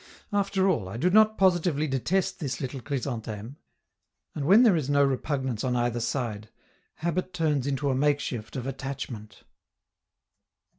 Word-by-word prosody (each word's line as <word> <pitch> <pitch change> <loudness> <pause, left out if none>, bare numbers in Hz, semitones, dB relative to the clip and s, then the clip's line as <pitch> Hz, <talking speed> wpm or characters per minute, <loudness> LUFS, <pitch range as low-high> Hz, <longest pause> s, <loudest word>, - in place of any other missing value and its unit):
After 195 -1 +1
all, 120 - 0
I 100 - -6
do 180 +9 +2
not 215 +2 +5
positively 175 -5 +2
detest 155 +8 0
this 140 -6 -3
little 130 -1 -5
Chrysantheme, 120 -3 -4 0.8
and 140 - -3
when 200 - +7
there 220 -7 +5
is 145 -4 -1
no 140 0 +4
repugnance 130 -3 -1
on 125 -1 0
either 120 -1 0
side, 115 -3 -3 0.6
habit 180 +2 -1
turns 150 -5 0
into 140 0 0
a - - 0
makeshift 135 -5 -1
of 125 -2 -4
attachment. 135 -5 -6
140 Hz, 145 wpm, -27 LUFS, 125-170 Hz, 0.8 s, when